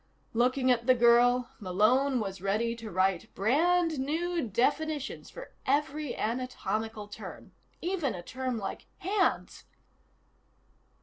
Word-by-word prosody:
Looking 255 Hz, +2 st, +3 dB
at 235 Hz, 0 st, +1 dB
the 255 Hz, -, +6 dB
girl, 240 Hz, +1 st, +4 dB
Malone 240 Hz, +8 st, +2 dB
was 195 Hz, -3 st, -4 dB
ready 215 Hz, +4 st, 0 dB
to 230 Hz, -1 st, -8 dB
write 185 Hz, -1 st, 0 dB
brand 320 Hz, -, +2 dB
new 335 Hz, +5 st, -1 dB
definitions 290 Hz, +6 st, -1 dB
for -, -, -10 dB, 0.2 s
every 295 Hz, 0 st, 0 dB
anatomical 220 Hz, -3 st, -3 dB
term. 205 Hz, -, -10 dB, 0.3 s
Even 340 Hz, -, -1 dB
a 175 Hz, -, -7 dB
term 255 Hz, +4 st, -3 dB
like 200 Hz, -3 st, -5 dB
"hands." 390 Hz, +1 st, 0 dB
250 Hz, 115 wpm, -29 LUFS, 220-295 Hz, 0.3 s, the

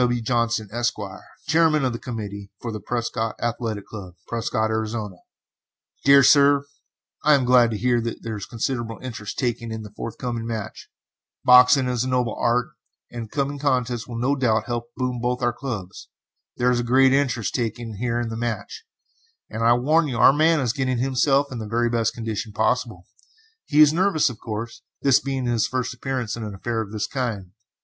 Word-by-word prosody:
W. 120 Hz, -1 st, +2 dB
JOHNSON, 115 Hz, -2 st, 0 dB
ESQ., 120 Hz, +1 st, 0 dB, 0.5 s
Chairman 155 Hz, -2 st, +3 dB
of 125 Hz, -, 0 dB
the 115 Hz, -, -5 dB
Committee 100 Hz, -5 st, -6 dB
for 120 Hz, -, -5 dB
the 110 Hz, -, -5 dB
Prescott 115 Hz, -1 st, -2 dB
Athletic 115 Hz, -3 st, -3 dB
Club, 95 Hz, -5 st, -9 dB
Prescott, 110 Hz, -1 st, -1 dB
Arizona: 110 Hz, -3 st, -3 dB, 0.9 s
DEAR 140 Hz, 0 st, +7 dB
SIR: 140 Hz, +1 st, +5 dB, 0.6 s
I 150 Hz, 0 st, +6 dB
am 135 Hz, -3 st, +1 dB
glad 125 Hz, -1 st, +5 dB
to 110 Hz, -, -3 dB
hear 120 Hz, +2 st, +1 dB
that 115 Hz, 0 st, -5 dB
there 115 Hz, -1 st, -4 dB
is 100 Hz, -, -6 dB
considerable 120 Hz, -1 st, -3 dB
interest 115 Hz, -4 st, -6 dB
taken 120 Hz, -3 st, -2 dB
in 110 Hz, 0 st, -5 dB
the 105 Hz, -, -10 dB
forthcoming 115 Hz, 0 st, -5 dB
match. 110 Hz, -3 st, -6 dB, 0.6 s
Boxing 125 Hz, +1 st, +7 dB
is 125 Hz, -1 st, 0 dB
a 130 Hz, -, -3 dB
noble 125 Hz, -3 st, 0 dB
art, 120 Hz, +1 st, +1 dB, 0.4 s
and 120 Hz, -1 st, -5 dB
this -, -, -33 dB
coming 140 Hz, 0 st, -1 dB
contest 125 Hz, -4 st, 0 dB
will 120 Hz, -2 st, -6 dB
no 130 Hz, +4 st, +1 dB
doubt 115 Hz, -5 st, +1 dB
help 120 Hz, -1 st, -3 dB
to 120 Hz, -, -37 dB
boom 125 Hz, -1 st, -2 dB
both 125 Hz, +1 st, -1 dB
our 120 Hz, 0 st, +2 dB
clubs. 110 Hz, -8 st, -6 dB, 0.5 s
There 125 Hz, +1 st, +2 dB
is 120 Hz, -, +1 dB
a -, -, -1 dB
great 130 Hz, +2 st, +4 dB
interest 130 Hz, -5 st, 0 dB
taken 115 Hz, -2 st, -3 dB
here 120 Hz, +1 st, -1 dB
in 120 Hz, -1 st, -2 dB
the 110 Hz, -, -5 dB
match, 115 Hz, -, -4 dB, 0.7 s
and 115 Hz, -, -3 dB
I 120 Hz, +1 st, +6 dB
warn 150 Hz, +7 st, +2 dB
you 125 Hz, -4 st, -3 dB
our 120 Hz, +3 st, +7 dB
man 160 Hz, +2 st, +3 dB
is 120 Hz, -3 st, 0 dB
getting 130 Hz, -2 st, -1 dB
himself 135 Hz, +2 st, +2 dB
in 125 Hz, -, -5 dB
the 110 Hz, -, -5 dB
very 120 Hz, +1 st, +1 dB
best 115 Hz, -1 st, 0 dB
condition 110 Hz, -2 st, -4 dB
possible. 110 Hz, -4 st, -1 dB, 0.6 s
He 150 Hz, 0 st, +4 dB
is 150 Hz, 0 st, +7 dB
nervous, 170 Hz, -5 st, +2 dB
of 115 Hz, -, -12 dB
course, 115 Hz, +1 st, -6 dB, 0.2 s
this 140 Hz, -1 st, +5 dB
being 135 Hz, -2 st, -3 dB
his 120 Hz, -2 st, +1 dB
first 130 Hz, -1 st, -2 dB
appearance 125 Hz, -3 st, -3 dB
in 115 Hz, -, -6 dB
an 105 Hz, -2 st, -6 dB
affair 115 Hz, +3 st, -2 dB
of 105 Hz, -2 st, -7 dB
this 110 Hz, -1 st, -2 dB
kind. 110 Hz, -9 st, -4 dB
120 Hz, 195 wpm, -23 LUFS, 115-130 Hz, 0.9 s, DEAR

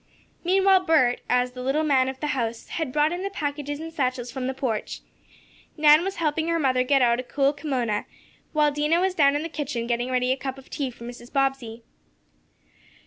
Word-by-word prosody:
Meanwhile 380 Hz, +1 st, +4 dB
Bert, 290 Hz, -7 st, +3 dB
as 250 Hz, 0 st, +2 dB
the 250 Hz, 0 st, -8 dB
"little 270 Hz, +5 st, 0 dB
man 265 Hz, -4 st, +3 dB
of 265 Hz, 0 st, -7 dB
the 300 Hz, -, -1 dB
house," 235 Hz, -3 st, -3 dB
had 320 Hz, -5 st, -3 dB
brought 300 Hz, +3 st, +2 dB
in 350 Hz, +1 st, -3 dB
the 395 Hz, -, -2 dB
packages 290 Hz, -5 st, -4 dB
and 325 Hz, +1 st, -7 dB
satchels 255 Hz, -4 st, -2 dB
from 255 Hz, 0 st, -4 dB
the 265 Hz, -, -2 dB
porch. 245 Hz, -6 st, -3 dB, 0.8 s
Nan 300 Hz, +1 st, +6 dB
was 390 Hz, +1 st, -3 dB
helping 320 Hz, -1 st, -1 dB
her 335 Hz, 0 st, +1 dB
mother 260 Hz, -5 st, +2 dB
get 270 Hz, +1 st, +3 dB
out 235 Hz, 0 st, +3 dB
a -, -, -3 dB
cool 275 Hz, +2 st, +1 dB
kimona, 255 Hz, -8 st, -2 dB, 0.5 s
while 300 Hz, -1 st, +3 dB
Dinah 300 Hz, +3 st, +1 dB
was 375 Hz, +1 st, +1 dB
down 285 Hz, -5 st, +4 dB
in 295 Hz, -, -1 dB
the -, -, -3 dB
kitchen 285 Hz, -7 st, -4 dB
getting 240 Hz, +1 st, -1 dB
ready 255 Hz, 0 st, +1 dB
a 260 Hz, -, +1 dB
cup 265 Hz, 0 st, -5 dB
of 270 Hz, -, -15 dB
tea 275 Hz, -3 st, -2 dB
for 235 Hz, -1 st, -13 dB
Mrs. 240 Hz, +1 st, -10 dB
Bobbsey. 270 Hz, -5 st, -1 dB
275 Hz, 205 wpm, -25 LUFS, 250-310 Hz, 0.8 s, Nan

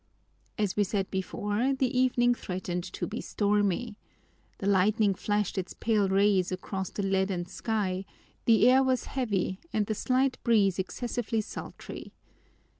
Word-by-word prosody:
As 210 Hz, -4 st, 0 dB
we 210 Hz, -, +3 dB
said 195 Hz, 0 st, -2 dB
before, 205 Hz, +7 st, -1 dB
the 260 Hz, -1 st, 0 dB
evening 245 Hz, -1 st, +3 dB
threatened 180 Hz, -5 st, -4 dB
to -, -, -3 dB
be 220 Hz, -, -5 dB
stormy. 205 Hz, +2 st, 0 dB, 0.6 s
The -, -, -6 dB
lightning 200 Hz, +1 st, +3 dB
flashed 205 Hz, +1 st, -1 dB
its 185 Hz, -, -6 dB
pale 210 Hz, -4 st, +1 dB
rays 195 Hz, -1 st, +3 dB
across 190 Hz, 0 st, -4 dB
the 200 Hz, -, -4 dB
leaden 190 Hz, -2 st, 0 dB
sky, 195 Hz, -1 st, -2 dB, 0.4 s
the 225 Hz, 0 st, +5 dB
air 260 Hz, +1 st, +6 dB
was 260 Hz, -1 st, +1 dB
heavy 200 Hz, -7 st, -1 dB
and 215 Hz, -1 st, +1 dB
the 215 Hz, -, -1 dB
slight 255 Hz, +4 st, +1 dB
breeze 200 Hz, -6 st, +3 dB
excessively 230 Hz, +3 st, -2 dB
sultry. 215 Hz, -, -8 dB
205 Hz, 140 wpm, -29 LUFS, 190-235 Hz, 0.6 s, air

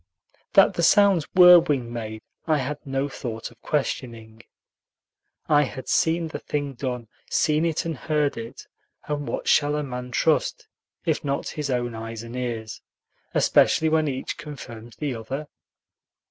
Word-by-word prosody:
That -, -, +6 dB
the -, -, -2 dB
sounds 200 Hz, -7 st, +5 dB
were 180 Hz, -1 st, +10 dB
wing 130 Hz, -7 st, -1 dB
made 110 Hz, -2 st, -6 dB, 0.2 s
I 155 Hz, -1 st, +3 dB
had 145 Hz, +2 st, -3 dB
no 135 Hz, +1 st, -1 dB
thought 115 Hz, -5 st, -6 dB
of 115 Hz, 0 st, -22 dB
questioning. 115 Hz, -6 st, -3 dB, 1.1 s
I 150 Hz, -1 st, +5 dB
had 135 Hz, -2 st, -4 dB
seen 165 Hz, 0 st, +1 dB
the -, -, -6 dB
thing 145 Hz, -2 st, -3 dB
done, 125 Hz, -2 st, -4 dB, 0.2 s
seen 155 Hz, +1 st, +2 dB
it 165 Hz, -1 st, -1 dB
and 165 Hz, -1 st, -2 dB
heard 150 Hz, +1 st, 0 dB
it; 115 Hz, +3 st, -8 dB, 0.4 s
and 145 Hz, -1 st, -3 dB
what -, -, -4 dB
shall 145 Hz, 0 st, +3 dB
a 150 Hz, -, -1 dB
man 125 Hz, -2 st, -6 dB
trust, 120 Hz, -, +1 dB, 0.4 s
if -, -, 0 dB
not 140 Hz, -1 st, -2 dB
his 150 Hz, -2 st, -4 dB
own 120 Hz, -2 st, -1 dB
eyes 115 Hz, 0 st, -6 dB
and 115 Hz, +1 st, -9 dB
ears, 115 Hz, -3 st, -4 dB, 0.5 s
especially 160 Hz, -, +4 dB
when 155 Hz, -1 st, +2 dB
each 130 Hz, -2 st, -4 dB
confirms 120 Hz, -7 st, -9 dB
the 145 Hz, -3 st, -3 dB
other? 125 Hz, +6 st, -5 dB
135 Hz, 155 wpm, -24 LUFS, 120-150 Hz, 1.1 s, were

